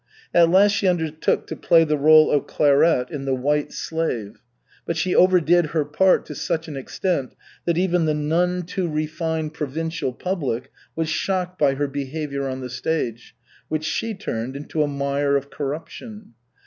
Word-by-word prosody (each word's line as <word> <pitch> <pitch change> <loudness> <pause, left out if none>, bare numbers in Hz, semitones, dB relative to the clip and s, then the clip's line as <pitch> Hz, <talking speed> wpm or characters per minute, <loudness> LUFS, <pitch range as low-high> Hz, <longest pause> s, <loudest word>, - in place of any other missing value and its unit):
At 170 -1 +6
last 195 +3 +5
she 200 -1 +1
undertook 160 -3 0
to - - -6
play 165 -2 +4
the 155 -1 +1
role 155 +2 +6
of 145 - +1
Clairette 145 -2 +3
in 140 -3 -5
The 135 -1 +1
White 145 +3 0
Slave. 130 -11 -3 0.5
But 170 - -1
she 180 +3 0
overdid 175 -2 +4
her 150 -1 -1
part 185 +6 +3
to - - -7
such 165 0 -2
an 150 - -7
extent 135 +1 -2 0.3
that 170 -1 +1
even 180 -2 +2
the 155 -1 +1
none 175 +4 0
too 175 +1 -3
refined 160 0 -2
provincial 160 -1 -3
public 140 -5 -3 0.2
was 160 -1 -1
shocked 180 +2 -2
by 140 -2 +3
her 145 +1 -1
behavior 140 0 -4
on 130 0 -5
the 125 - -6
stage, 120 -6 -3 0.3
which 155 0 -2
she 225 +7 -2
turned 130 - -4
into 150 +2 -3
a 150 - +2
mire 140 0 0
of 140 +1 -6
corruption. 165 - -7
155 Hz, 170 wpm, -22 LUFS, 140-170 Hz, 0.5 s, At